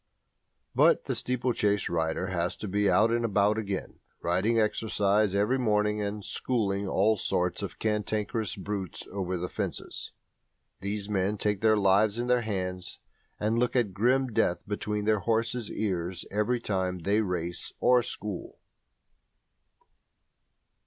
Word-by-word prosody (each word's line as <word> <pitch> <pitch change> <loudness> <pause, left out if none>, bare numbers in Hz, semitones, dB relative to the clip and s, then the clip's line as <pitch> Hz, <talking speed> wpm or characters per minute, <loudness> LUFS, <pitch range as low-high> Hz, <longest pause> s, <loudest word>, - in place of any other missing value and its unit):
But - - +4
the - - -1
steeplechase 120 -5 0
rider 80 +1 -1
has 90 -1 -1
to 105 - -6
be 100 +1 +2
out 110 +2 +4
and 120 0 +1
about 105 0 +2
again, 100 -3 -4 0.2
"riding 95 +7 +1
exercise" 105 -2 +2
every 105 +7 +2
morning, 105 -2 +1
and 105 0 -3
"schooling" 100 -5 -1
all 105 +3 +3
sorts 90 -2 0
of - - -5
cantankerous 105 0 -1
brutes 95 -2 -4
over 95 -1 -2
the 90 +1 -3
fences. - - -5 0.7
These 100 +1 -3
men 100 0 0
take 105 -1 -1
their 110 -1 +4
lives 100 +2 +3
in 120 - -1
their 125 0 +3
hands 90 -4 -3 0.4
and 110 +2 +1
look 125 +1 +1
at 115 -6 +2
grim 125 +6 +2
death 85 -4 +1
between 105 0 -2
their 110 -1 +3
horses' 115 +2 0
ears 90 -4 -2
every 105 +4 +1
time 95 -4 -1
they 100 +4 +2
race 90 -3 -3
or 125 0 +5
"school". 105 -3 -5
105 Hz, 140 wpm, -28 LUFS, 95-110 Hz, 0.7 s, or